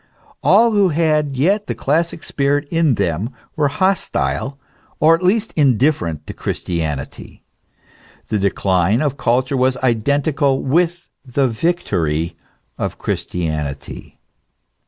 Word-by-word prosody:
All 235 0 +5
who 200 -3 +3
had 155 -3 +1
yet 200 +9 +1
the - - -2
classic 165 +3 -1
spirit 145 +1 0
in 165 -6 +2
them 90 +4 -1 0.3
were 150 -2 +2
hostile, 160 -5 -1 0.4
or 160 +2 +6
at 165 - +1
least 210 +4 +1
indifferent 130 - +1
to - - -7
Christianity. 80 -6 -4 0.9
The 105 - 0
decline 95 - +1
of 140 -3 0
culture 130 +1 +1
was 130 0 +2
identical 140 +3 +1
with 175 +5 0
the 135 0 0
victory 90 - -1 0.4
of - - -3
Christianity. 75 -5 -4
140 Hz, 115 wpm, -19 LUFS, 100-165 Hz, 0.9 s, or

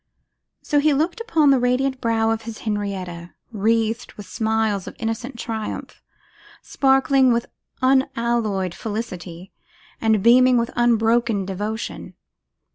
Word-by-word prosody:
So 295 - +2
he 295 0 +3
looked 335 +10 -1
upon 320 -11 +3
the 270 - +4
radiant 255 +2 0
brow 225 -1 +1
of 225 0 -2
his 225 -1 -8
Henrietta, 190 -5 -4 0.2
wreathed 225 +2 0
with 205 - -10
smiles 220 -1 -1
of - - -8
innocent 235 +3 -4
triumph, 225 -2 -5 0.6
sparkling 270 -1 +3
with 235 0 -1 0.3
unalloyed 235 -7 +1
felicity, 185 -5 -6 0.5
and 220 -3 +2
beaming 250 +1 +6
with 235 0 0
unbroken 230 -3 +2
devotion. 205 +4 -5
225 Hz, 120 wpm, -22 LUFS, 210-250 Hz, 0.6 s, beaming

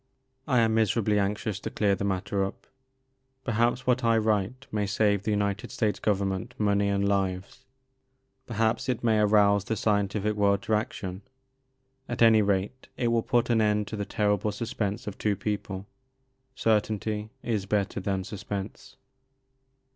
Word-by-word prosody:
I 125 -4 +3
am 110 -1 +2
miserably 110 -1 +2
anxious 105 0 -1
to - - -5
clear 100 -2 +1
the 95 - -2
mat 95 -2 -1
ter 100 -1 0
up. 95 - -6 0.8
Perhaps 120 +1 +1
what 125 0 +2
I 115 -1 +4
write 110 +4 0
may 105 -1 -1
save 100 0 +2
the 105 - -3
United 100 0 -1
States 110 -3 -1
Government 95 -2 -1
money 100 -1 +2
and 100 0 +1
lives, 95 -1 -2 0.8
per 115 - -6
haps 110 +4 +1
it 125 -2 -1
may 110 -2 +3
arouse 100 -1 +4
the 110 - -1
scientific 105 0 0
world 100 -1 +2
to 110 - -1
action; 95 -3 -2 0.9
at 120 -1 +1
any 110 -1 +7
rate 100 +5 -1
it 120 -2 +1
will 115 0 +2
put 120 +1 +1
an 115 -1 +3
end 105 -1 +2
to - - -4
the 105 - -2
terrible 105 0 0
sus 110 +2 -5
pense 105 +1 -2
of 105 - -6
two 105 -1 +1
people. 100 -1 -4 0.7
Certainty 110 -1 0
is 105 -5 -1
better 100 0 0
than 95 -1 -2
suspense. 100 +1 -6
105 Hz, 160 wpm, -27 LUFS, 100-110 Hz, 0.9 s, any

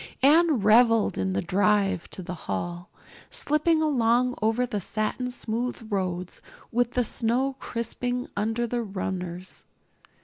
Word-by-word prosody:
Anne 310 +1 +5
reveled 225 +1 +4
in 95 0 -1
the 100 - -1
drive 195 -1 +1
to 185 - -6
the 180 - -6
hall, 175 - -5 0.4
slipping 315 +2 +3
along 250 -3 +2
over 225 +3 +1
the 210 -4 -4
satin 215 +6 0
smooth 240 -1 -3
roads 180 -2 -3 0.3
with 245 +1 0
the 250 - +2
snow 245 +4 0
crisping 245 +2 -3
under 225 +3 -1
the 240 +1 -2
runners. 185 -3 -5
225 Hz, 130 wpm, -26 LUFS, 190-250 Hz, 0.4 s, Anne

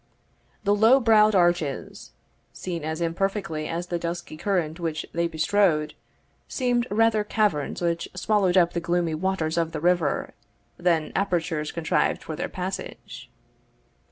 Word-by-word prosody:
The 200 - +3
low 225 +6 +5
browed 215 -3 +5
arches, 175 -6 0 0.4
seen 170 -4 -5
as 160 +2 -3
imperfectly 170 -2 -2
as 170 +1 -3
the 175 -1 -3
dusky 170 -1 -5
current 165 -2 -1
which 160 -2 -3
they 170 0 +1
bestrode, 160 -1 +1 0.5
seemed 245 -2 0
rather 220 0 +3
caverns 205 -8 0
which 170 0 -1
swallowed 200 -4 +2
up 175 -2 +4
the 175 - -1
gloomy 170 -1 0
waters 170 -1 -1
of 165 -1 -1
the 155 - -3
river, 175 -2 +1 0.4
than 170 -3 +1
apertures 165 -5 -1
contrived 165 -1 0
for 155 - -5
their 175 - -4
passage. 185 +1 -6
175 Hz, 135 wpm, -25 LUFS, 160-200 Hz, 0.5 s, low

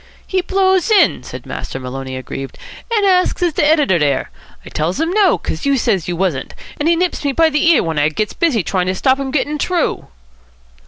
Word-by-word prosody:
"He 375 -1 0
blows 380 +1 +1
in," 430 -2 +4
said - - -9
Master 135 - -6
Maloney, 130 0 -6
aggrieved, 135 +1 -7 0.3
"and 425 -3 +2
asks 365 -2 +2
is 345 -3 +1
de - - +1
editor 295 - +3
dere. 145 -2 0 0.3
I - - -9
tells 165 - -2
him 325 +2 0
no, 400 -2 +3
'cos 160 - -5
youse 275 -3 +1
said 195 -8 0
youse 175 -1 -3
wasn't, 175 -8 -2 0.2
and 300 +3 +1
he 340 - +4
nips 355 -1 -1
me 280 -1 0
by 325 +2 +3
the 300 +3 +2
ear 335 - +4
when 160 -3 -2
I 145 +1 +3
gets 210 +7 -3
busy 275 - +1
to 185 0 -1
stop 260 +6 +2
him 275 -1 -3
gettin' 295 +2 -1
t'roo." 350 +1 -1
280 Hz, 210 wpm, -17 LUFS, -, 0.3 s, in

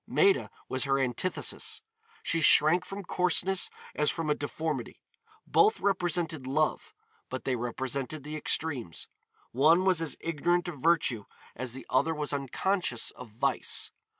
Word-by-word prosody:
Maida 395 -1 +3 0.2
was 130 +2 -1
her 135 0 +2
antithesis. 135 +7 -1 0.4
She 165 - +1
shrank 155 +3 +5
from 195 +1 -7
coarseness 180 +1 +1 0.2
as 150 0 +1
from 160 -3 -1
a - - +5
deformity. 145 -2 -4 0.5
Both 420 +1 +4
represented 175 -7 0
Love, 155 +3 0 0.3
but 130 - -5
they 130 - 0
represented 130 +4 -3
the 150 +1 -6
extremes. 145 - -1 0.4
One 160 +8 +4
was 185 -3 +4
as 165 - -1
ignorant 170 +2 0
of 165 -5 -6
virtue 155 -10 +2 0.3
as 130 -2 -4
the 130 - -8
other 160 +5 +1
was 150 -1 -2
unconscious 140 - -1
of 125 -2 -11
vice. 125 +5 -1
150 Hz, 140 wpm, -29 LUFS, 130-175 Hz, 0.5 s, shrank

